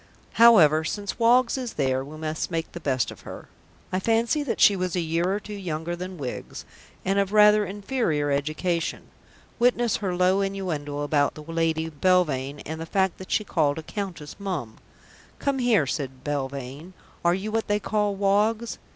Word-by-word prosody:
However, 160 -10 +7
since 200 +6 -4
Woggs 240 +2 +4
is 250 -3 -5
there, 130 -2 0
we 150 +3 -10
must 155 0 -3
make 165 -2 -3
the 170 - -7
best 130 -6 0
of - - -12
her. - - -10 0.4
I 185 - 0
fancy 230 +8 +1
that 285 -5 -3
she 205 - +6
was 185 -1 -2
a - - +1
year 170 +2 0
or 200 - 0
two 210 0 -9
younger 175 -4 -4
than 180 +1 -7
Wiggs 130 -5 -6 0.4
and 195 +1 +2
of 200 -1 0
rather 210 -1 +5
inferior 195 - -1
education. 155 +4 -2 0.5
Witness 240 -2 +2
her 190 -4 -2
low 185 +2 +3
innuendo 170 -8 -3
about 145 -1 +1
the 155 - -9
Lady 165 0 -1
Belvane, 150 -4 +1
and 160 +1 -5
the 165 - -6
fact 190 0 0
that 185 - -10
she 215 - +2
called 150 -7 +1
a 160 - -5
Countess 170 -6 -6
"Mum." 170 - -4 0.6
"Come 275 -1 -1
here," 235 - +3
said 135 -2 -4
Belvane. 140 +3 -5 0.3
"Are 170 +1 +3
you 200 +3 -4
what 225 0 -1
they 205 -1 +1
call 210 -1 0
Woggs?" 210 +4 +1
180 Hz, 175 wpm, -25 LUFS, 150-205 Hz, 0.6 s, However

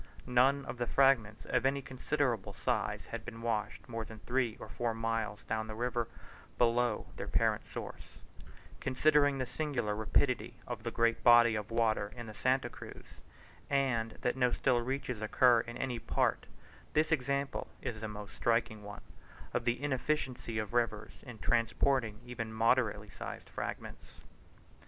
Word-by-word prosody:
None 135 +3 +3
of 120 0 -6
the 120 - 0
fragments 120 -6 +3
of 125 - +1
any 135 +1 +1
considerable 130 -4 -1
size - - -1
had - - -4
been 115 - -8
washed 110 -3 -2
more 115 -1 -3
than 110 0 -10
three 120 0 -1
or - - -8
four 115 -2 -2
miles 115 -2 -2
down 110 0 -2
the 110 - -6
river 120 0 -1 0.5
below 120 -1 +2
their - - -5
parent - - +1
source: - - -8 0.6
considering 145 +1 +3
the 130 - -1
singular 125 -5 -2
rapidity 115 +2 +1
of 120 -3 -5
the 115 - -2
great 115 0 +1
body 120 -1 +8
of 105 -1 -3
water 110 -3 +1
in 120 -1 -7
the 110 - -8
Santa 130 +4 +1
Cruz, - - -10 0.6
and 125 -5 +1
that 125 - +1
no 125 -2 +3
still 125 -1 +2
reaches 125 -2 -3
occur 120 +2 +5
in 115 +1 -5
any 125 -3 -2
part, - - 0 0.5
this 155 +2 +2
example 140 -1 0 0.2
is 110 -3 -4
a 110 - -3
most 105 -1 -8
striking 115 -2 +1
one, 105 0 -9 0.5
of - - -1
the 120 +3 0
inefficiency 130 -4 -1
of 110 0 -3
rivers 110 -3 0
in 125 -4 -10
transporting 115 -1 +1
even 115 -2 -5
moderately 110 -2 +2
sized - - -7
fragments. - - -7
120 Hz, 155 wpm, -33 LUFS, 110-130 Hz, 0.6 s, body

